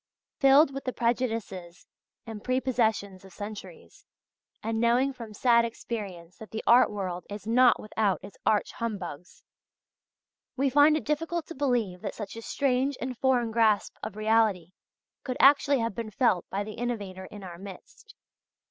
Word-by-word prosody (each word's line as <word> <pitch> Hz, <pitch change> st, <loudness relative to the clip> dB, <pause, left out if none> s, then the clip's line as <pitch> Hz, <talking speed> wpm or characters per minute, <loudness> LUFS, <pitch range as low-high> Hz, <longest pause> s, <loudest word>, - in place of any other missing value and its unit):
Filled 275 Hz, +1 st, +6 dB
with 275 Hz, -, -6 dB
the 255 Hz, -, -2 dB
prejudices 225 Hz, -7 st, -2 dB, 0.4 s
and 220 Hz, -3 st, -8 dB
prepossessions 225 Hz, -7 st, 0 dB
of 190 Hz, -, -14 dB
centuries, 215 Hz, -, -10 dB, 0.6 s
and 225 Hz, +1 st, -1 dB
knowing 245 Hz, +4 st, +2 dB
from 230 Hz, -4 st, -9 dB
sad 235 Hz, +2 st, +3 dB
experience 195 Hz, -7 st, -6 dB
that 220 Hz, -, -11 dB
the 220 Hz, -, -5 dB
art 245 Hz, +2 st, +6 dB
world 185 Hz, -4 st, -4 dB
is 205 Hz, +1 st, -7 dB
not 245 Hz, +2 st, +4 dB
without 210 Hz, -2 st, -1 dB
its 195 Hz, 0 st, -11 dB
arch 210 Hz, -, +1 dB
humbugs, 185 Hz, -8 st, -6 dB, 1.1 s
we 270 Hz, 0 st, +1 dB
find 295 Hz, +3 st, +5 dB
it -, -, -5 dB
difficult 325 Hz, +2 st, -2 dB
to -, -, -5 dB
believe 240 Hz, -, -1 dB
that -, -, -5 dB
such 210 Hz, -1 st, -7 dB
a 230 Hz, -, -7 dB
strange 265 Hz, +2 st, 0 dB
and 255 Hz, 0 st, -4 dB
foreign 250 Hz, -3 st, +2 dB
grasp 220 Hz, -2 st, +2 dB
of -, -, -6 dB
reality 215 Hz, -5 st, +1 dB, 0.5 s
could 255 Hz, -2 st, -4 dB
actually 280 Hz, 0 st, +5 dB
have 230 Hz, -3 st, -1 dB
been 225 Hz, +1 st, -5 dB
felt 200 Hz, -4 st, +1 dB
by 200 Hz, +1 st, -2 dB
the 215 Hz, +1 st, -7 dB
innovator 205 Hz, -6 st, -4 dB
in 205 Hz, +1 st, -11 dB
our 175 Hz, -2 st, -9 dB
midst. 195 Hz, -1 st, -12 dB
225 Hz, 155 wpm, -27 LUFS, 200-255 Hz, 1.1 s, Filled